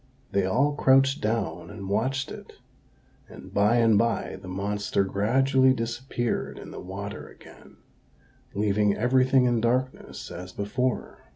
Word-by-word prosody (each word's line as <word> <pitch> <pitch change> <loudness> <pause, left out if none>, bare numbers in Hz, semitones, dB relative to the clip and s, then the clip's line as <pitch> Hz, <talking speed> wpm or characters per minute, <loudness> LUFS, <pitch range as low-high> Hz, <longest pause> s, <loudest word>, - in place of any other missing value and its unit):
They 100 -1 +1
all 140 +9 +2
crouched 135 -1 +3
down 100 -7 -2
and 100 -2 -8
watched 130 +7 -1
it; - - -10 0.8
and - - -12
by 105 +3 +3
and 115 -3 +4
by 115 -3 0
the 95 - -10
monster 100 +2 -1
gradually 130 +7 +3
disappeared 120 +1 -3
in - - -10
the - - -8
water 100 +2 -7
again, - - -16 0.8
leaving 105 0 +2
everything 130 +2 +3
in 120 -2 +2
darkness 125 +3 -2
as 90 +1 -8
before. 125 +6 -2
115 Hz, 130 wpm, -26 LUFS, 100-130 Hz, 0.8 s, and